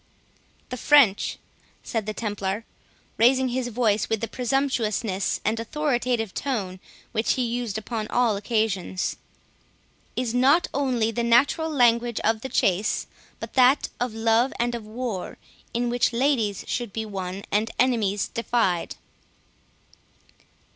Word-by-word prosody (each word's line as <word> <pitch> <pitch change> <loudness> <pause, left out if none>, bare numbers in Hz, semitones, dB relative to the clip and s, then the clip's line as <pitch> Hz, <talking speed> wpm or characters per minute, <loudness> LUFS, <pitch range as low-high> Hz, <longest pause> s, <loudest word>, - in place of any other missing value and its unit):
14 - - -36
"The 250 - -5
French," 250 -7 +4 0.5
said 220 -3 -3
the 215 - -2
Templar, 205 -1 -3 0.5
raising 255 +3 +4
his 250 0 -2
voice 220 -3 +1
with 225 - 0
the 230 - -3
presumptuous 230 -6 -1
and 220 +2 +1
authoritative 245 -4 -1
tone 200 -9 -3 0.3
which 220 0 +1
he 255 - -1
used 235 -3 -2
upon 220 0 -4
all 235 -3 +2
occasions, 200 -3 -1 1.0
"is 245 -2 -1
not 270 +7 +4
only 250 -5 +1
the 235 - -2
natural 265 +7 +3
language 240 -4 +2
of 220 0 +1
the 265 - -5
chase, 195 -1 +1 0.3
but - - -7
that 260 +2 +4
of 245 -2 -2
love 225 +3 +2
and 240 0 0
of 230 -3 -6
war, 225 -4 -5 0.3
in 240 +1 -1
which 245 -1 +2
ladies 235 -6 +1
should 240 -4 -3
be 220 +2 -4
won 195 -1 -5
and 215 +2 +1
enemies 220 -6 +1
defied." 230 -7 0
230 Hz, 135 wpm, -25 LUFS, 215-250 Hz, 1.0 s, French